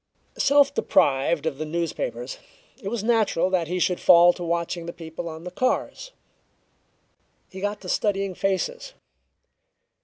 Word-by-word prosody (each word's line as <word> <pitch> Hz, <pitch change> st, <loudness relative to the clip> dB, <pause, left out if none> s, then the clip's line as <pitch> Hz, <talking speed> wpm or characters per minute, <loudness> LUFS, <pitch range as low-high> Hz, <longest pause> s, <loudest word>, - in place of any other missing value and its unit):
Self 280 Hz, 0 st, +4 dB
deprived 140 Hz, -, +2 dB
of 150 Hz, -3 st, -2 dB
the -, -, -2 dB
newspapers, 170 Hz, -, -4 dB, 0.4 s
it 195 Hz, -, -7 dB
was 215 Hz, 0 st, -3 dB
natural 215 Hz, -6 st, +2 dB
that 175 Hz, -3 st, +1 dB
he 180 Hz, +3 st, -2 dB
should 180 Hz, 0 st, +1 dB
fall 175 Hz, 0 st, +7 dB
to 175 Hz, -, -7 dB
watching 170 Hz, 0 st, -2 dB
the 170 Hz, -, -5 dB
people 165 Hz, 0 st, -7 dB
on 160 Hz, 0 st, -9 dB
the 180 Hz, -, -7 dB
cars. 255 Hz, -, -2 dB, 1.4 s
He 190 Hz, -, -9 dB
got 205 Hz, +1 st, -3 dB
to 185 Hz, -, -10 dB
studying 195 Hz, 0 st, 0 dB
faces. 195 Hz, -, -2 dB
180 Hz, 145 wpm, -24 LUFS, 170-215 Hz, 1.4 s, fall